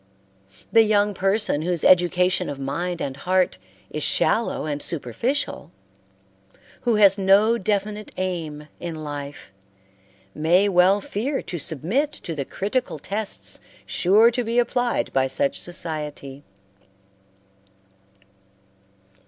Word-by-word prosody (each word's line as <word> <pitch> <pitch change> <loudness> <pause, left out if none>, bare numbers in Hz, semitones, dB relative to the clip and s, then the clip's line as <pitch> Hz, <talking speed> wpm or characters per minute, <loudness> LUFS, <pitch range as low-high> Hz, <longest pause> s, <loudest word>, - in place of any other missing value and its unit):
The 225 - +7
young 210 -1 +2
person 195 -4 0
whose 175 0 -2
education 180 0 +3
of 145 - -5
mind 170 +6 -3
and 135 -1 -4
heart 185 +5 0 0.3
is - - -4
shallow 230 -7 +1
and 145 -1 -3
superficial, 175 - -2 1.1
who 240 -2 +1
has 200 -1 +5
no 205 +4 +4
definite 210 +1 -2
aim 165 -5 -4
in 170 -2 -5
life, 145 -4 -7 0.8
may 175 +6 +3
well 190 +1 +4
fear 260 +9 -3
to 175 - -5
submit 185 - 0
to 170 - -6
the 140 -3 -4
critical 210 - -2
tests 200 +7 -3 0.3
sure 210 +6 +4
to 245 +1 -1
be 230 +1 -2
applied 245 0 0
by 135 0 +2
such 135 +1 -1
society. 150 -5 -6
185 Hz, 110 wpm, -23 LUFS, 155-215 Hz, 1.1 s, The